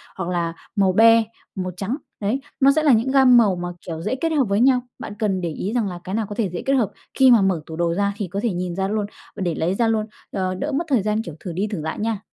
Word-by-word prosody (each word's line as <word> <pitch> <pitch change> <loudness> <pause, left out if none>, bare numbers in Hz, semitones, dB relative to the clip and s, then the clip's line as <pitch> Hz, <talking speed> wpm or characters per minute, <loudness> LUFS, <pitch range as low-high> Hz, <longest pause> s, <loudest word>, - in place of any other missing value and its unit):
hoặc 185 -2 -4
là 170 -2 -1 0.2
màu 195 -3 +3
be, 225 +2 +6 0.3
màu 185 -2 -3
trắng. 210 +8 -2 0.2
Đấy. 220 +7 -1 0.2
Nó 275 0 +6
sẽ 310 +2 +1
là 295 - +5
những 230 +4 +2
gam 265 -2 +6
màu 210 -5 +4
mà, 175 0 -4 0.2
kiểu, 165 -2 -5
dễ 255 - -1
kết 325 +5 -1
hợp 295 -3 +3
với 200 +1 +1
nhau. 255 0 +4 0.2
Bạn - - -6
cần 195 -4 0
để 170 - -2
ý 190 +7 -4
rằng 235 -4 +1
là 180 -2 -6
cái 190 - -4
nào 220 -1 0
có 205 - -5
thể 215 -4 0
dễ 175 - -5
kết 275 - +2
hợp 245 -7 +2 0.2
khi 265 -1 +6
mà 235 -3 +6
mở 190 -4 +1
tủ 160 - -8
đồ 170 0 0
ra 200 +2 0
thì 205 - -3
có 195 +3 -4
thể 230 -5 +1
nhìn 180 0 -3
ra 190 +1 -1
luôn, 210 0 -1 0.3
và - - -7
để 175 -3 -1
lấy 175 +4 0
ra 230 +2 +2
luôn, 220 -1 +1 0.3
ờ, 185 -1 -2
đỡ 285 +11 -3
mất 305 +5 -1
thời 255 -6 +3
gian, 210 +1 0
kiểu, 170 -8 -8
thử 175 -1 -6
đi 195 +5 -1
thử 200 -6 -4
lại 160 +1 -4
nha. 220 -1 -1
205 Hz, 295 wpm, -22 LUFS, 180-235 Hz, 0.3 s, be